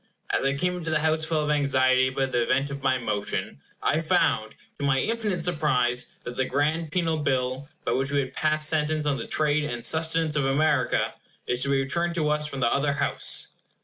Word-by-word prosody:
As -, -, +1 dB
I 135 Hz, 0 st, +1 dB
came 180 Hz, +4 st, 0 dB
into 170 Hz, -2 st, -5 dB
the 155 Hz, -, +2 dB
House 160 Hz, 0 st, +1 dB
full 160 Hz, -1 st, 0 dB
of 150 Hz, -, 0 dB
anxiety 130 Hz, -3 st, +3 dB
about 130 Hz, 0 st, -1 dB
the 120 Hz, -1 st, +1 dB
event 135 Hz, +4 st, +1 dB
of 140 Hz, 0 st, -6 dB
my 130 Hz, -1 st, +2 dB
motion, 105 Hz, -, -3 dB, 0.2 s
I -, -, +2 dB
found, -, -, +1 dB, 0.2 s
to -, -, -4 dB
my 135 Hz, -1 st, +2 dB
infinite 210 Hz, -2 st, -1 dB
surprise, 125 Hz, -7 st, +1 dB, 0.2 s
that 120 Hz, -, -6 dB
the 130 Hz, -, +1 dB
grand 150 Hz, +4 st, 0 dB
penal 165 Hz, -2 st, 0 dB
bill, 135 Hz, -1 st, -1 dB, 0.2 s
by -, -, 0 dB
which 135 Hz, +1 st, 0 dB
we 140 Hz, 0 st, +2 dB
had 130 Hz, -, -6 dB
passed 155 Hz, 0 st, +1 dB
sentence 155 Hz, -1 st, +1 dB
on 145 Hz, -2 st, +1 dB
the -, -, -6 dB
trade 150 Hz, -1 st, +1 dB
and 120 Hz, -5 st, -4 dB
sustenance 160 Hz, -1 st, +1 dB
of 145 Hz, -2 st, +1 dB
America, 145 Hz, -1 st, +1 dB, 0.3 s
is 125 Hz, 0 st, 0 dB
to 140 Hz, -, +1 dB
be 140 Hz, -, +3 dB
returned 170 Hz, +6 st, 0 dB
to 155 Hz, -3 st, +1 dB
us 150 Hz, 0 st, -1 dB
from 135 Hz, -3 st, -5 dB
the 120 Hz, -, +2 dB
other 140 Hz, +1 st, +1 dB
House. -, -, -1 dB
145 Hz, 210 wpm, -26 LUFS, 130-155 Hz, 0.3 s, anxiety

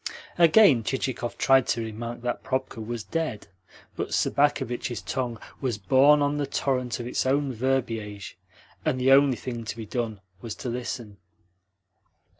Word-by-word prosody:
Again 170 Hz, -, +6 dB
Chichikov 125 Hz, 0 st, -3 dB
tried 135 Hz, -2 st, +4 dB
to 115 Hz, -, 0 dB
remark 115 Hz, +2 st, -6 dB
that 120 Hz, 0 st, -2 dB
Probka 130 Hz, -3 st, -3 dB
was 115 Hz, 0 st, -5 dB
dead, 160 Hz, -9 st, -3 dB, 0.5 s
but -, -, -2 dB
Sobakevitch's 125 Hz, -4 st, 0 dB
tongue 125 Hz, -3 st, -3 dB, 0.2 s
was 125 Hz, -6 st, -1 dB
borne 135 Hz, +9 st, +5 dB
on 145 Hz, +1 st, 0 dB
the 145 Hz, -1 st, -1 dB
torrent 125 Hz, -4 st, -1 dB
of 120 Hz, -, -5 dB
its 125 Hz, -, -1 dB
own 135 Hz, 0 st, +1 dB
verbiage, 115 Hz, -6 st, -2 dB, 0.5 s
and 145 Hz, -5 st, 0 dB
the 130 Hz, +1 st, +3 dB
only 135 Hz, -2 st, +6 dB
thing 120 Hz, +1 st, -5 dB
to 115 Hz, -, -6 dB
be 115 Hz, -, -6 dB
done 110 Hz, -1 st, -3 dB, 0.2 s
was 115 Hz, -3 st, -6 dB
to 125 Hz, -, -5 dB
listen. 120 Hz, -3 st, -5 dB
125 Hz, 150 wpm, -26 LUFS, 115-135 Hz, 0.5 s, Again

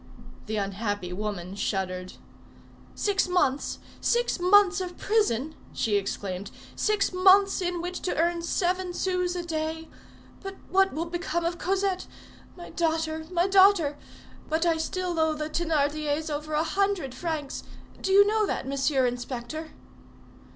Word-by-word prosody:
The 215 Hz, -, -2 dB
unhappy 200 Hz, -2 st, -2 dB
woman 195 Hz, -2 st, -4 dB
shuddered. 185 Hz, -2 st, -2 dB, 0.8 s
"Six 400 Hz, -2 st, +1 dB
months! 290 Hz, -7 st, +1 dB, 0.2 s
six 475 Hz, -5 st, +1 dB
months 385 Hz, +1 st, +5 dB
of 355 Hz, -1 st, -5 dB
prison!" 315 Hz, -, +1 dB, 0.2 s
she 215 Hz, -3 st, 0 dB
exclaimed. 195 Hz, -1 st, -3 dB, 0.3 s
"Six 420 Hz, -3 st, +1 dB
months 385 Hz, +2 st, +5 dB
in 350 Hz, -1 st, -2 dB
which 355 Hz, 0 st, -4 dB
to 365 Hz, -, -2 dB
earn 340 Hz, +1 st, +1 dB
seven 360 Hz, +1 st, -1 dB
sous 360 Hz, -1 st, 0 dB
a 350 Hz, -, -3 dB
day! 320 Hz, -1 st, -3 dB, 0.5 s
But 390 Hz, 0 st, -6 dB, 0.2 s
what 385 Hz, +1 st, +4 dB
will 320 Hz, +4 st, -3 dB
become 345 Hz, 0 st, -2 dB
of 340 Hz, 0 st, -2 dB
Cosette? 385 Hz, 0 st, 0 dB, 0.5 s
My 350 Hz, -, -9 dB
daughter! 320 Hz, -1 st, -1 dB
my 350 Hz, 0 st, +2 dB
daughter! 385 Hz, -6 st, +5 dB, 0.5 s
But 320 Hz, +2 st, +1 dB
I 335 Hz, -1 st, +3 dB
still 350 Hz, +1 st, -2 dB
owe 315 Hz, -1 st, +2 dB
the 305 Hz, 0 st, -4 dB
Thénardiers 305 Hz, -1 st, 0 dB
over 300 Hz, +1 st, -4 dB
a 305 Hz, +1 st, +2 dB
hundred 390 Hz, -6 st, 0 dB
francs; 300 Hz, 0 st, -4 dB, 0.4 s
do 385 Hz, -, -1 dB
you 400 Hz, +1 st, +8 dB
know 425 Hz, 0 st, +2 dB
that, -, -, -3 dB
Monsieur 275 Hz, -1 st, +1 dB
Inspector?" 245 Hz, +5 st, -4 dB
330 Hz, 140 wpm, -27 LUFS, 280-370 Hz, 0.8 s, you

